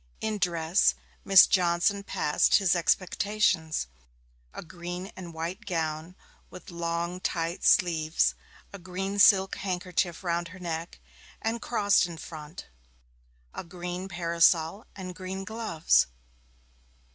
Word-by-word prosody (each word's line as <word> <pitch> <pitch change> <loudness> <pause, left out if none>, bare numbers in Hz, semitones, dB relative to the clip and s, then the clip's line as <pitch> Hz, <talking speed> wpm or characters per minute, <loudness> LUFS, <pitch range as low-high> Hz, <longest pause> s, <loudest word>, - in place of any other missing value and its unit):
In 215 -1 -2
dress, 170 0 +2 0.3
Miss 195 -1 +8
Johnson 180 +2 +2
passed 150 -6 +2
his 190 -3 +3
expectations 180 - 0 0.7
a - - -8
green 180 +3 -7
and 175 -2 -8
white 170 +7 -6
gown, 160 -1 -3 0.3
with 180 - -12
long, 170 +1 -3
tight 170 -1 -3
sleeves, 165 -3 +3 0.4
a 200 - -8
green 190 +3 -4
silk 195 -2 +5
handkerchief 180 -2 -2
round 170 -1 -1
her 185 +2 -12
neck 165 -1 -5 0.4
and 225 +1 -2
crossed 205 -5 +2
in 170 -2 -9
front, 155 0 -9 0.9
a - - -6
green 180 +1 -6
parasol, 170 +1 +1
and 185 -2 -7
green 190 +1 -6
gloves. 220 -8 +1
180 Hz, 115 wpm, -27 LUFS, 170-190 Hz, 0.9 s, Miss